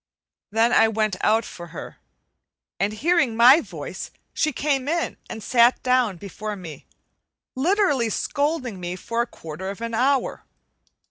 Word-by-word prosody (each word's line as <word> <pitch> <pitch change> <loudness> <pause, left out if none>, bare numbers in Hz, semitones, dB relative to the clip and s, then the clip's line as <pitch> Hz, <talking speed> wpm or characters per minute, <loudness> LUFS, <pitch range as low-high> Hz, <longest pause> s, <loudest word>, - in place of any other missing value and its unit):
Then 225 +3 +2
I 225 - +6
went 215 -2 0
out 220 +1 +3
for 175 - -9
her, - - -9 0.8
and 200 +3 +1
hearing 270 0 +1
my 255 +7 +8
voice - - -7 0.2
she 310 - +1
came 275 -1 -1
in 335 +2 -1
and 220 - -7
sat 240 +1 +4
down 250 -6 +2
before 210 +3 -6
me, 170 -6 -10 0.7
literally 290 - +2
scolding 285 - -1
me 175 0 -4
for 230 +5 -2
a 235 - -1
quarter 170 -2 -7
of 200 - -6
an 230 0 -4
hour. 260 +3 +1
230 Hz, 145 wpm, -23 LUFS, 210-270 Hz, 0.8 s, my